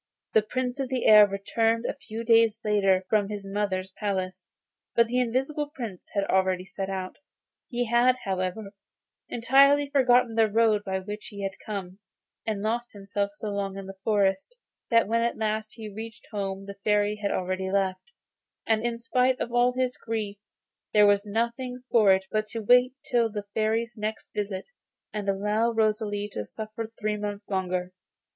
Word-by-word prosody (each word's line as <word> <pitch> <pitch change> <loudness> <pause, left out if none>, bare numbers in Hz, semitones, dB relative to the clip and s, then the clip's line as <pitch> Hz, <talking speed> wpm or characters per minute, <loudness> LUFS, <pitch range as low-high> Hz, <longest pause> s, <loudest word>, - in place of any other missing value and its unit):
The 220 - +6
Prince 250 +4 -3
of 270 -2 -2
the 260 -2 -1
Air 210 -1 +9
returned 225 +4 0
a - - -1
few 230 -5 -7
days 225 -1 +4
later 195 -3 +3
from 205 -1 +2
his 205 -1 -5
mother's 195 -2 -2
palace, 185 -3 -3 0.5
but 235 - +5
the 245 +2 0
Invisible 270 +5 -1
Prince 230 - -7
had 200 - +2
already 185 -1 +1
set 195 0 -5
out. 185 -1 -4 0.5
He 245 -1 -1
had, 240 +2 +4
however, 190 +2 -3 0.6
entirely 275 +4 +4
forgotten 250 -4 +4
the 225 -1 +4
road 215 -1 +3
by 190 -2 -2
which 210 +2 -7
he 200 -2 -7
had 195 - -1
come, 195 -2 -6 0.5
and 210 -2 -2
lost 235 +2 -2
himself 200 0 -3
for - - -21
so 210 0 -5
long 200 -1 -3
in 195 - -6
the 195 0 -10
forest, 200 - +1 0.3
that 230 -4 +4
when 230 +2 +1
at 235 0 0
last 215 0 -2
he 220 -2 -7
reached 220 +2 -8
home 195 -1 -3
the 200 0 -9
Fairy 210 0 +2
had 205 -1 -2
already 185 0 -2
left, 190 - -1 0.5
and, 220 0 +2
in 235 -1 -1
spite 250 +2 +1
of 235 - -3
all 245 +1 +4
his 255 0 -1
grief, 215 -3 -4 0.5
there 210 -1 +7
was 205 0 +3
nothing 235 +4 -2
for 215 -4 +6
it 190 0 +3
but 215 0 0
to 225 +2 -5
wait 250 +4 +5
till 235 -3 +2
the 205 -1 -5
Fairy's 225 +2 0
next 215 0 -5
visit, 205 - -4 0.4
and 205 -2 -2
allow 210 +4 +1
Rosalie 215 -2 0
to 105 - -3
suffer 215 - -6
three 210 -1 -1
months 205 0 -5
longer. 185 -2 -2
215 Hz, 175 wpm, -27 LUFS, 195-230 Hz, 0.6 s, Air